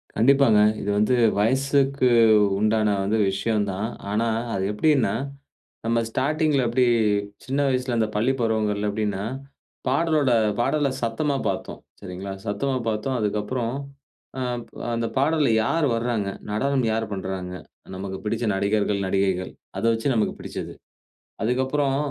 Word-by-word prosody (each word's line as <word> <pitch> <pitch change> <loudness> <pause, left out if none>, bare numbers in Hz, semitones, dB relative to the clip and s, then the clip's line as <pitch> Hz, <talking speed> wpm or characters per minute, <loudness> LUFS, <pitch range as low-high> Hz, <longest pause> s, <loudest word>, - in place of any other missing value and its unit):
கண்டிப்பாங்க. 130 -1 +5 0.2
இது 105 - -3
வந்து 105 +4 +3 0.2
வயசுக்கு 135 +3 +2 0.5
உண்டான 110 -1 +2
வந்து 105 +3 +1
விஷயம் 105 +1 0
தான். 100 +4 -2 0.2
ஆனா 110 +3 +1 0.3
அது 95 - -1
எப்படின்னா, 135 +4 +2 0.7
நம்ம 115 0 +2
ஸ்டார்ட்டிங்ல 150 +3 +1
எப்டி, 125 +2 +2 0.6
சின்ன 135 +2 -1
வயசுல, 125 -2 0
அந்த 110 - +2
பள்ளி 115 +5 +2
பருவங்கள்ல 105 -2 0
எப்டின்னா, 105 -1 -2 0.6
பாடலோட 150 0 +2 0.3
பாடல 140 +3 +1
சத்தமா 125 +5 0
பார்த்தோம். - - -5 0.2
சரிங்களா? 95 0 -6
சத்தமா 115 +6 -1
பார்த்தோம். 110 +5 -2
அதுக்கு 105 0 0
அப்புறம் 120 +2 -2 0.7
அ, - - -2 0.5
அந்த 115 0 -1
பாடல்ல 150 +1 +2
யார் 160 +8 +1
வர்றாங்க? 115 -4 -1 0.2
நடனம் 135 +4 +1
யார் 110 0 0
பண்றாங்க? 95 -2 -4 0.4
நமக்கு 95 0 -5
பிடிச்ச 110 +2 -2
நடிகர்கள், 100 +1 +1
நடிகைகள் 95 -1 0 0.3
அத - - -4
வச்சு 115 +4 -2
நமக்கு 110 -3 +1
பிடிச்சது. - - -6 0.7
அதுக்கு 125 +4 +1
அப்புறம், 135 0 0
115 Hz, 130 wpm, -24 LUFS, 105-135 Hz, 0.7 s, கண்டிப்பாங்க